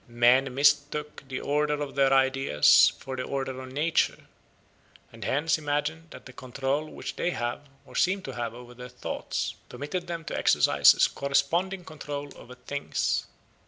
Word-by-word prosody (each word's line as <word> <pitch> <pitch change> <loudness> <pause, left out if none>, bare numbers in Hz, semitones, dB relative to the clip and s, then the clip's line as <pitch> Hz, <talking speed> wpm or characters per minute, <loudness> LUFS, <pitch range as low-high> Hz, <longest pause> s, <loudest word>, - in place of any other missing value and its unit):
Men 120 +3 +3
mistook 145 +1 +1
the 130 -1 -4
order 150 +1 +1
of 145 -1 -4
their 135 -1 +3
ideas 135 - +5
for 130 0 -7
the 130 - -3
order 135 -1 -4
of 130 0 -9
nature, 155 +5 0 0.9
and 115 -1 -10
hence 150 +8 +1
imagined 150 +2 -2
that - - -12
the 130 - -12
control 135 +4 -3
which - - -7
they - - 0
have, 120 -1 -4 0.2
or - - -15
seem 190 +1 +1
to 135 - -6
have, 120 -2 -4
over 125 0 -11
their 125 +1 -10
thoughts, 125 - -4 0.2
permitted 150 +5 -5
them 170 -2 -5
to - - -4
exercise - - +5
a - - -1
corresponding 170 +7 0
control 145 -2 -7
over 125 - -12
things. 140 +3 -2
140 Hz, 160 wpm, -27 LUFS, 130-150 Hz, 0.9 s, ideas